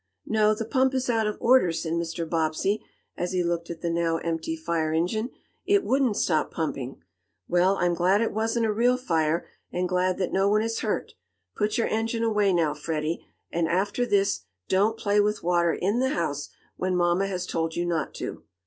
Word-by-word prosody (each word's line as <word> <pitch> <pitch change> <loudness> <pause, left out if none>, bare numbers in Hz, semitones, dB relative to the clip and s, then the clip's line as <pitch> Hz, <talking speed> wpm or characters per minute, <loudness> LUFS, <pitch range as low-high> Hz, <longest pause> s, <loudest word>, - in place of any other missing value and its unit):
"No, 215 -1 +3
the 225 - -4
pump 260 +3 +2
is 260 -1 +1
out 225 -2 +1
of 210 - -3
order," 240 -8 +5
said 165 0 -3
Mr. 165 0 -2
Bobbsey, 165 +6 0 0.3
as 175 +1 -3
he 180 -1 +1
looked 170 0 -2
at 170 -1 -6
the 170 - -1
now 165 -1 +1
empty 165 - -2
fire 165 - -1
engine. 180 +9 0 0.3
"It 395 +1 +3
wouldn't 260 -5 +2
stop 155 -3 +1
pumping. 135 -5 -4 0.4
Well, 180 +3 +3
I'm 175 0 +2
glad 180 +4 +3
it 230 - 0
wasn't 225 +2 0
a 215 - +1
real 245 +3 +3
fire, 165 -8 0 0.3
and 180 +1 -1
glad 180 0 +1
that 185 - -2
no 195 +1 +3
one 215 +1 +3
is 225 0 -2
hurt. 215 - -2 0.4
Put 210 +1 0
your 230 - +2
engine 225 +1 -1
away 210 -3 +2
now, 165 -4 +2
Freddie, 155 +1 -3 0.2
and, 165 -1 0
after 200 +8 0
this, 200 -4 +2 0.3
don't 210 +4 +2
play 205 -1 +2
with 210 +1 +1
water 170 -1 +3
in 200 +8 0
the 260 +1 +2
house, 145 - -2 0.3
when 185 0 0
mamma 175 +2 +2
has 185 -2 -3
told 165 0 -2
you 175 - -1
not 165 -4 -2
to." - - -5
185 Hz, 195 wpm, -26 LUFS, 170-220 Hz, 0.4 s, order